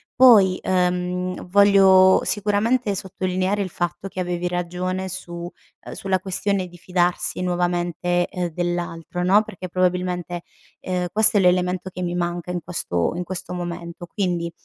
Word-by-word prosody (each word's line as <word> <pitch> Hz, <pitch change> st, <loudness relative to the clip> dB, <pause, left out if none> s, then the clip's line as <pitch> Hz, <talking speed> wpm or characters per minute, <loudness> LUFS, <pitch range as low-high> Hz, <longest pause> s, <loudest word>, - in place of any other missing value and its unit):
Poi, 210 Hz, -8 st, +6 dB
uhm, 180 Hz, 0 st, -1 dB
voglio 190 Hz, -1 st, +6 dB
sicuramente 210 Hz, +2 st, +1 dB
sottolineare 190 Hz, +1 st, -1 dB
il 185 Hz, -, -5 dB
fatto 175 Hz, +3 st, -3 dB
che 185 Hz, -, -7 dB
avevi 180 Hz, -1 st, -2 dB
ragione 180 Hz, +1 st, -3 dB
su, 185 Hz, -1 st, -7 dB, 0.5 s
uhm, -, -, -7 dB
sulla 190 Hz, -1 st, -1 dB
questione 190 Hz, 0 st, -1 dB
di 175 Hz, 0 st, -14 dB
fidarsi 180 Hz, 0 st, 0 dB
nuovamente, 175 Hz, 0 st, 0 dB
uhm, 180 Hz, -1 st, -1 dB
dell'altro 175 Hz, 0 st, -3 dB
no, 195 Hz, +4 st, +5 dB
perché 185 Hz, -3 st, -8 dB
probabilmente, 180 Hz, -1 st, -1 dB, 0.4 s
uhm, 180 Hz, -1 st, -2 dB
questo 215 Hz, +1 st, +3 dB
è -, -, +5 dB
l'elemento 180 Hz, 0 st, +2 dB
che 180 Hz, -, -5 dB
mi 175 Hz, 0 st, -2 dB
manca 175 Hz, 0 st, -2 dB
in 180 Hz, -, -2 dB
questo 90 Hz, -, -1 dB
in 180 Hz, -, -2 dB
questo 180 Hz, 0 st, -6 dB
momento, 175 Hz, -1 st, -6 dB
quindi, 175 Hz, -2 st, -2 dB
180 Hz, 145 wpm, -22 LUFS, 175-190 Hz, 0.5 s, Poi